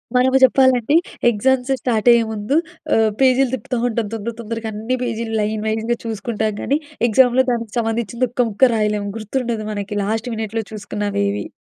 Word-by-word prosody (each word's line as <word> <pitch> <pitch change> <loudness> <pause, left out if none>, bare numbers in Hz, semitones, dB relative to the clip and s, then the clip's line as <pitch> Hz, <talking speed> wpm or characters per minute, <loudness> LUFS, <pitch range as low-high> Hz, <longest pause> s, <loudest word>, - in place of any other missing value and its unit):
మనము 260 +1 +4
చెప్పాలంటే 260 0 +4 0.3
exams 250 +4 +1
start 230 -2 0
అయ్యే 235 -1 +5
ముందు 215 +6 -2 0.4
ఆహ్, 220 -1 +3
పేజీలు 260 0 +4
తిప్పుతా 255 0 -4
ఉంటాం. 225 -2 -2
తొందర, 225 +1 -4
తొందరగా 225 0 -5
అన్నీ 225 +5 -2
పేజీలు 230 -1 -3
లైన్ 215 0 -2
వైస్‌గా 225 +2 -1
చూసుకుంటాం 220 0 -2
గానీ, 285 +3 0 0.3
ఎగ్జామ్‌లో 250 +3 +4
దానికి 230 -3 -3
సంబంధించింది 230 +2 -1
ఒక్క 245 -1 +1
ముక్క 240 +4 +3
రాయలేము 210 -1 0
గుర్తుండదు 225 0 -3
మనకి 205 0 -5
లాస్ట్ 220 +4 -2
మినిట్‌లో 220 0 -3 0.6
ఏవి. 100 0 -3
230 Hz, 150 wpm, -19 LUFS, 215-250 Hz, 0.6 s, అయ్యే